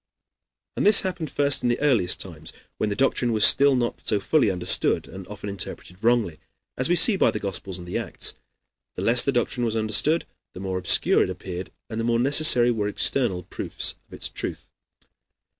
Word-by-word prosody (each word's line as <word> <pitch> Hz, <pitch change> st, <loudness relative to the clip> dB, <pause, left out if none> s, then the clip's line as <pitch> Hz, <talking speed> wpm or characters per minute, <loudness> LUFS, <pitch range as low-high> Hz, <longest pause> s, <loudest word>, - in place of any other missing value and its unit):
And -, -, -2 dB
this 210 Hz, 0 st, +7 dB
happened 180 Hz, -5 st, -4 dB
first 140 Hz, 0 st, +2 dB
in 120 Hz, -, 0 dB
the 120 Hz, -, -1 dB
earliest 120 Hz, -12 st, +1 dB
times, 80 Hz, -4 st, -8 dB, 0.3 s
when 110 Hz, -, -1 dB
the 100 Hz, -, -3 dB
doctrine 125 Hz, 0 st, 0 dB
was 110 Hz, -1 st, +5 dB
still 140 Hz, 0 st, +5 dB
not 120 Hz, -2 st, -3 dB
so 105 Hz, -, +3 dB
fully 145 Hz, +3 st, +1 dB
understood 90 Hz, -1 st, -1 dB
and 95 Hz, -1 st, -11 dB
often 105 Hz, 0 st, -9 dB
interpreted 95 Hz, -1 st, -7 dB
wrongly, 115 Hz, -9 st, +1 dB, 0.4 s
as 130 Hz, -, -1 dB
we 175 Hz, -, +3 dB
see 200 Hz, +5 st, +6 dB
by -, -, +3 dB
the -, -, -3 dB
Gospels 95 Hz, -2 st, -5 dB
and 90 Hz, -1 st, -11 dB
the 90 Hz, -, -3 dB
Acts. -, -, -3 dB, 0.6 s
The -, -, -5 dB
less 120 Hz, +2 st, +4 dB
the 140 Hz, -, 0 dB
doctrine 120 Hz, -1 st, -1 dB
was 115 Hz, -1 st, -1 dB
understood, 110 Hz, +9 st, +1 dB, 0.3 s
the -, -, -10 dB
more 95 Hz, -1 st, -4 dB
obscure 90 Hz, -, +2 dB
it -, -, 0 dB
appeared 90 Hz, 0 st, -7 dB, 0.2 s
and 110 Hz, -1 st, -6 dB
the -, -, -2 dB
more 115 Hz, 0 st, +1 dB
necessary 125 Hz, -1 st, +4 dB
were 105 Hz, -3 st, -2 dB
external 105 Hz, -3 st, +1 dB
proofs 90 Hz, -, -1 dB
of -, -, -19 dB
its -, -, -4 dB
truth. -, -, -7 dB
115 Hz, 195 wpm, -23 LUFS, 95-135 Hz, 0.6 s, this